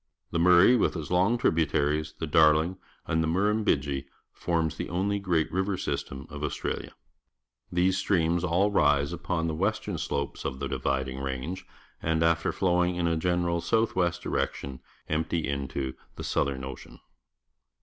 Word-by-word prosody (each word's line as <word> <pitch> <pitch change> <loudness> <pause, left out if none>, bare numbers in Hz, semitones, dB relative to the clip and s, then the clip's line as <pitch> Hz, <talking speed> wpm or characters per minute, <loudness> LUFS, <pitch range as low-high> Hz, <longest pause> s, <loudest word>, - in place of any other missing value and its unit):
The 85 - 0
Murray, 90 +7 +6
with 115 - +1
its 75 -1 -6
long 95 +7 +3
tributaries, 80 -5 +1
the 80 - -3
Darlin 80 +2 +4
g 95 - -19 0.3
and 80 0 +1
the - - 0
Murrujnbidgee, 80 -7 +1 0.3
forms 80 -2 -1
the - - -5
only 100 +4 0
great 85 -5 0
river 95 +2 0
sj'stem 65 -4 -4
of 75 0 -6
Australia. 75 - -3 0.8
These 90 +1 +2
streams 85 -3 +1
all 90 +4 +2
rise 75 -6 +3
upon 85 -2 -2
the 80 - -1
western 100 +7 -1
sloi)es 70 0 -3
of 65 - -3
the 70 +1 -3
Dividing 65 0 -2
Range, 70 +7 -4 0.4
and, 80 0 +1
after 85 0 +2
flowing 90 -1 +1
in 90 -1 -1
a 85 0 +2
general 85 0 0
south 110 +6 +1
west 85 -2 0
direction, 70 -2 -2 0.3
empty 80 +1 -1
into 70 -1 -3 0.2
the - - -7
Southern 70 -2 -1
Ocean. 65 0 -9
80 Hz, 155 wpm, -28 LUFS, 70-90 Hz, 0.8 s, Murray